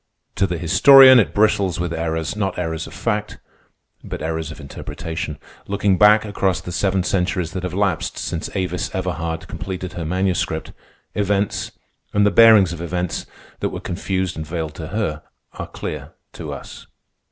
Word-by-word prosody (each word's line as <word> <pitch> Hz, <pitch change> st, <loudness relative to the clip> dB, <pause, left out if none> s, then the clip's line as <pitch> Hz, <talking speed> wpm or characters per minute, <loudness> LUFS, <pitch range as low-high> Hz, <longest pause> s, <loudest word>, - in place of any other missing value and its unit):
To 95 Hz, -, +1 dB
the 90 Hz, -1 st, -3 dB
historian 130 Hz, -, +8 dB
it 110 Hz, -, +2 dB
bristles 100 Hz, -4 st, +2 dB
with 85 Hz, -1 st, -2 dB
errors—not 80 Hz, +4 st, -2 dB
errors 80 Hz, -1 st, -3 dB
of -, -, -12 dB
fact, 105 Hz, +1 st, -2 dB, 0.7 s
but -, -, -6 dB
errors 80 Hz, 0 st, -3 dB
of 80 Hz, -, -9 dB
interpretation. 80 Hz, +1 st, -6 dB, 0.3 s
Looking 100 Hz, -1 st, +1 dB
back 105 Hz, +1 st, +6 dB
across 100 Hz, -3 st, 0 dB
the 90 Hz, -, -7 dB
seven 95 Hz, 0 st, +1 dB
centuries 90 Hz, 0 st, -1 dB
that 95 Hz, -, -4 dB
have 90 Hz, -1 st, -4 dB
lapsed 100 Hz, -4 st, 0 dB
since 80 Hz, -, -4 dB
Avis 90 Hz, -2 st, -2 dB
Everhard 80 Hz, 0 st, -3 dB
completed 95 Hz, 0 st, -6 dB
her 85 Hz, -, -5 dB
manuscript, 90 Hz, +2 st, -1 dB, 0.4 s
events, 100 Hz, 0 st, -1 dB, 0.4 s
and 105 Hz, 0 st, +4 dB
the 105 Hz, -, +4 dB
bearings 110 Hz, -5 st, +7 dB
of 85 Hz, -, -7 dB
events, 90 Hz, 0 st, -3 dB, 0.3 s
that -, -, -1 dB
were -, -, -6 dB
confused 95 Hz, 0 st, -2 dB
and 80 Hz, -, -4 dB
veiled 80 Hz, -1 st, -4 dB
to 80 Hz, 0 st, -7 dB
her, 90 Hz, -7 st, -2 dB, 0.3 s
are -, -, -6 dB
clear -, -, -7 dB, 0.2 s
to -, -, -7 dB
us. -, -, -9 dB
90 Hz, 160 wpm, -21 LUFS, 80-100 Hz, 0.7 s, historian